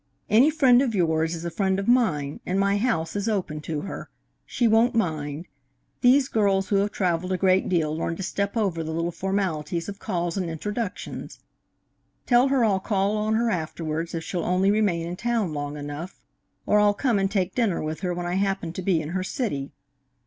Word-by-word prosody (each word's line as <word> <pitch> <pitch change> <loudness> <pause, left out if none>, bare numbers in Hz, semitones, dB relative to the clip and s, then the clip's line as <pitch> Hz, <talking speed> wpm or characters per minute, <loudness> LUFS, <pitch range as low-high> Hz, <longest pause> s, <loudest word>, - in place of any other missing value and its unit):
Any 240 +8 +6
friend 265 -5 +5
of 245 -5 0
yours 160 -2 +1
is 165 +1 -7
a 170 - -3
friend 190 +1 0
of 195 - -3
mine, 165 - +2
and 185 +2 -1
my 200 +1 +2
house 185 -8 -1
is 205 +2 -1
open 180 -8 -2
to 155 -1 -4
her. 195 - -7 0.4
She 240 - +1
won't 230 +3 +3
mind. 155 -6 -1 0.6
These 260 +2 +5
girls 200 -5 +1
who 200 - +3
have 200 +1 +2
travelled 180 -1 -1
a 185 - +1
great 185 +1 +2
deal 160 -4 +1
learn 165 +1 -2
to 195 - -5
step 200 +3 -2
over 185 -7 0
the 160 0 -4
little 165 +1 -1
formalities 175 -4 -2
of 200 0 -7
calls 175 -3 -2
and 180 -3 -2
introductions. 205 +6 -5 0.9
Tell 245 +1 +4
her 265 -3 +3
I'll 195 -3 +2
call 200 +1 0
on 215 +1 0
her 230 0 +1
afterwards, 165 -1 -3
if 165 - -3
she'll 175 -1 -3
only 185 +2 +2
remain 200 -6 +1
in 175 +1 -5
town 230 -7 -1
long 145 0 -4
enough, 145 +5 -7 0.5
or 210 - +4
I'll 205 0 +4
come 235 -3 +1
and 195 0 +1
take 190 -2 -1
dinner 225 -8 +1
with 155 0 -4
her 180 -2 -2
when 175 0 -3
I 175 +1 -1
happen 195 -4 -1
to 185 - -5
be 175 -4 +1
in 150 - -6
her 185 +2 -2
city. 185 - -3
190 Hz, 205 wpm, -25 LUFS, 165-210 Hz, 0.9 s, Any